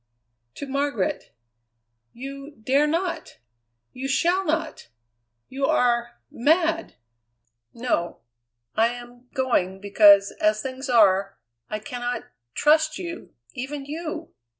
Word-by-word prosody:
"To - - -6
Margaret." 275 -6 -2 0.8
"You 275 +3 -9
dare 280 +5 +3
not! 335 +2 -2 0.6
You 265 +1 -4
shall 350 +7 +2
not! 315 - -2 0.6
You 270 +1 -1
are 240 - +1
mad!" 325 +5 +1 0.8
"No. 230 - -2 0.5
I 225 +1 +4
am 245 +1 -9
going, 195 -8 0
because, 200 0 +6
as 215 0 +2
things 265 +1 -5
are, 195 -4 +4 0.3
I 215 - -2
cannot 245 +3 -4 0.3
trust 310 +1 +3
you, 345 -2 -7 0.2
even 275 +2 -5
you! 315 +2 -6
265 Hz, 105 wpm, -24 LUFS, 230-310 Hz, 0.8 s, because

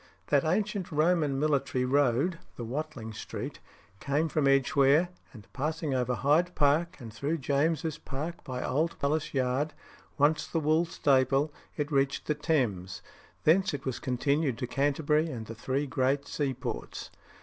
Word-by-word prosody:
That 140 -2 +4
ancient 195 +2 -1
Roman 155 -3 +2
military 140 -4 +1
road 140 +5 +2 0.2
(the 120 - -6
Watling 130 -3 -5
Street) 110 - -6 0.4
came 145 +6 0
from 150 -2 +1
Edgeware, 140 +4 +4 0.2
and 105 -5 -13
passing 155 +1 -2
over 125 -1 0
Hyde 155 - +2
Park 160 +5 +2
and 115 -4 -9
through 140 +7 -2
St. 160 - -6
James's 155 +3 0
Park 155 +6 -5
by 125 -3 -4
Old 155 +6 0
Palace 150 +2 0
Yard, 130 +4 0 0.4
once 150 +2 +3
the 165 - -1
Wool 155 +2 +2
Staple, 140 -1 +2 0.2
it 150 +1 -2
reached 135 -1 +1
the 150 - +1
Thames. 120 - -1 0.4
Thence 170 0 +4
it 140 - -8
was 130 -2 -2
continued 135 +1 0
to - - -2
Canterbury 145 +4 +1
and 115 -6 -5
the 115 - -7
three 130 +5 -2
great 135 +1 0
seaports. 135 -4 -4
145 Hz, 150 wpm, -29 LUFS, 130-155 Hz, 0.4 s, That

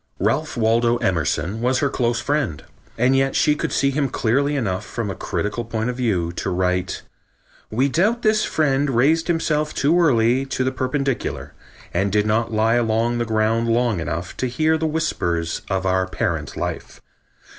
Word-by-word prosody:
Ralph 135 - -1
Waldo 115 +1 +2
Emerson 90 - -1
was 125 +2 +2
her 140 0 +1
close 120 -2 0
friend, 140 - -1 0.3
and 125 +3 +3
yet 135 0 +1
she 150 - +4
could - - -3
see 140 0 +2
him 140 -1 0
clearly 140 +7 +1
enough 105 -7 -1
from 105 0 -4
a - - -6
critical 105 +6 -3
point 115 +1 -2
of 125 - -8
view 95 -9 0
to - - -2
write: 90 0 -1 0.7
"We 125 +6 +1
doubt 210 - +1
this 215 -1 +3
friend 145 -2 +1
raised 145 +7 +2
himself 155 -3 0
too 165 +5 +3
early 125 -4 +3
to 130 - -1
the 130 - 0
perpendicular, 130 0 -2 0.4
and 95 +3 0
did 105 +2 +2
not 115 +2 0
lie 110 +2 +2
along 115 +1 +1
the 120 - 0
ground 110 +1 +1
long 115 -4 +1
enough 85 +2 -4
to 130 - -1
hear 155 +6 +1
the 160 0 0
whispers 85 - -1
of 95 -1 -1
our 95 0 +1
parent 80 -5 -3
life. - - -5
120 Hz, 175 wpm, -21 LUFS, 105-140 Hz, 0.7 s, she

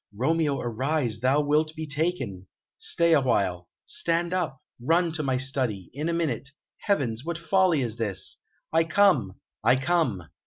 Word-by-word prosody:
Romeo, 150 +4 +1
arise; 120 0 -1
thou 130 +5 +3
wilt 155 +2 +1
be 160 - -4
taken.... 145 - -3 0.3
Stay 170 -1 +2
awhile.... 100 - +1 0.2
Stand 170 +1 +1
up! 170 -8 -2 0.2
Run 165 +6 +2
to 160 0 -2
my 130 -3 0
study.... 130 -8 -1
In 150 +5 -2
a - - 0
minute.... 160 -4 -1 0.3
Heavens! 130 - 0
what 170 +1 -3
folly 170 -2 +2
is 115 -2 -4
this?... 105 -5 -2 0.4
I 165 0 +4
come 165 - +3 0.3
I 120 +4 +5
come!" 135 - 0
145 Hz, 150 wpm, -26 LUFS, 120-165 Hz, 0.4 s, I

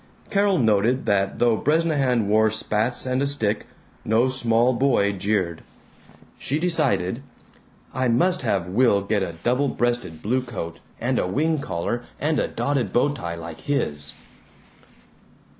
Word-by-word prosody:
Carol 200 -1 +3
noted 115 +2 +2
that 100 -1 +1
though 120 -2 +3
Bresnahan 140 -6 +1
wore 110 +1 +4
spats 110 +3 -1
and 130 +1 0
a 140 - +1
stick, 110 -7 -1 0.4
no 115 +4 +2
small 120 -1 +2
boy 120 -5 +2
jeered. 95 -4 -1 0.8
She 140 - -1
decided, 150 - +1 0.7
"I 130 0 0
must 180 +11 +2
have 95 -3 0
Will 100 0 +3
get 100 0 0
a 85 -3 -3
double 125 +4 +2
breasted 120 -12 -2
blue 125 +5 +1
coat 85 -10 -6 0.2
and - - 0
a - - 0
wing 155 - 0
collar 95 +2 -3 0.2
and 150 +2 +1
a - - +1
dotted 135 -9 -1
bow 125 +4 +3
tie 85 -11 -5
like 85 -1 -8
his." 75 - -2
120 Hz, 140 wpm, -23 LUFS, 100-135 Hz, 0.8 s, wore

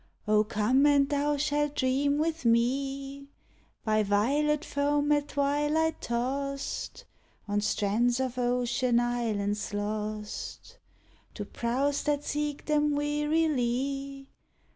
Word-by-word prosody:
Oh, 210 0 +4
come! 220 +7 +2
and 280 -1 +4
thou 290 +1 0
shall 295 +1 +1
dream 280 +1 +1
with 320 0 -1
me 270 +4 0 0.6
By 215 -1 +3
violet 280 +10 +1
foam 290 +1 +1
at 290 -1 +2
twilight 295 +3 0
tost 275 +4 -3 0.4
On 205 0 0
strands 225 +4 +1
of 255 -1 -2
ocean 245 0 +1
islets 215 -4 -1
lost 210 0 -5 0.6
I'o - - -1
prows 270 +5 -1
that 295 -1 0
seek 295 -1 -3
them 300 -1 +2
wearily. 275 -2 -1
275 Hz, 105 wpm, -28 LUFS, 235-290 Hz, 0.6 s, Oh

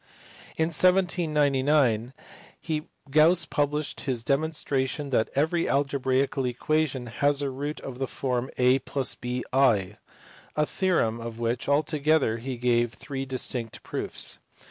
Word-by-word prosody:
In 160 0 +2
1799 150 - +2 1.0
Gauss 160 +5 +5
published 150 0 -1
his 125 -4 -2
demonstration 140 0 -1
that 115 -3 +2
every 160 +4 +1
algebraical 135 -1 +1
equation 135 +1 0
has 140 +5 +1
a 140 - -1
root 145 +3 -4
of 130 -1 -7
the 135 - -1
form 125 -1 -2
a 125 +1 +4
+ 135 -2 -3
bi; 125 -5 +1 0.6
a 150 - +2
theorem 150 -12 0
of 115 -1 -6
which 120 +3 -2
altogether 150 -4 +2
he 130 +1 -5
gave 120 -1 +1
three 135 -2 -5
distinct 125 -3 -3
proofs. - - -5
135 Hz, 120 wpm, -26 LUFS, 125-150 Hz, 1.0 s, Gauss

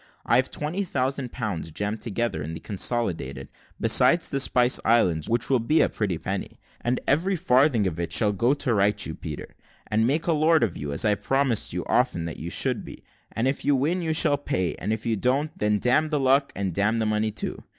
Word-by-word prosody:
I 120 - +3
have 130 +1 +1
twenty 160 +7 -3
thousand 135 -6 -2
pounds 100 -9 -4
jammed 105 +6 -3
together 115 -6 -2
in 80 +2 -5
the - - -7
consolidated, 90 - -2 0.3
besides 170 0 +4
the 140 - -1
Spice 125 -2 +3
Islands, 90 -9 +2
which 115 0 +1
will 130 -2 +2
be 150 +8 +2
a - - +3
pretty 100 -6 -2
penny; 95 +3 -5 0.2
and 120 +1 0
every 175 +8 +2
farthing 135 - +3
of 85 -3 -3
it 85 - -3
shall 105 -3 +3
go 120 +7 +2
to 135 -4 -1
right 100 0 +2
you, 80 - -4
Peter, 75 -1 -8 0.3
and 110 +1 +1
make 150 +5 0
a 170 - +2
lord 155 -2 +3
of 100 -7 -1
you, 70 -1 -5
as 70 - 0
I 105 - +4
promised 135 +2 0
you - - -4
often 85 - +1
that 85 - -6
you 85 - -5
should - - 0
be; - - -11 0.3
and 115 +3 -1
if 135 - -2
you 145 0 +3
win 160 +8 0
you 160 -2 -1
shall 150 -3 +3
pay, 95 -12 -1
and 105 - -3
if 110 +1 -3
you 115 -2 0
don't, 135 +8 0
then 105 0 +1
damn 130 +8 +2
the 150 -2 0
luck 135 +1 +2
and 95 -3 -2
damn 100 +5 +1
the 110 - 0
money 110 0 0
too. 105 0 -6
115 Hz, 225 wpm, -25 LUFS, 100-140 Hz, 0.3 s, besides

